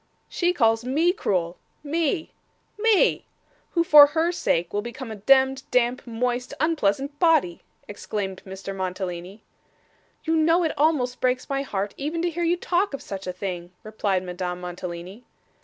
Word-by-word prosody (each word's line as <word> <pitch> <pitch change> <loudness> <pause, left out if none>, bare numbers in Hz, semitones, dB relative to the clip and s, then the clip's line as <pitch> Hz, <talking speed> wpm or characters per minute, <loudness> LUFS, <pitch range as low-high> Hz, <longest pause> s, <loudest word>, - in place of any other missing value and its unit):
'She 350 0 +1
calls 225 -8 +2
me 310 +8 +2
cruel 180 - -1 0.3
me 320 +2 -1 0.5
me 440 -2 +3 0.5
who 335 - +3
for 300 -4 +9
her 320 +3 0
sake 170 - -1
will 205 - 0
become 235 +1 -7
a - - -5
demd, 265 +5 +3
damp, 250 +1 +1
moist, 245 +2 -2
unpleasant 285 -2 0
body!' 310 - +3 0.3
exclaimed 200 -2 -5
Mr. 195 0 -7
Mantalini. 185 +1 -5 0.8
'You 325 0 +1
know 330 +3 +3
it 320 - 0
almost 280 -5 +1
breaks 255 0 0
my 275 0 0
heart, 205 -6 -3
even 315 +4 -3
to 350 - 0
hear 340 +1 -3
you 340 +1 +2
talk 355 -2 0
of - - -9
such 195 -1 -7
a - - -1
thing,' 180 -1 -6
replied 205 -3 -1
Madame 180 0 -4
Mantalini. 180 +4 -7
245 Hz, 155 wpm, -24 LUFS, 190-315 Hz, 0.8 s, for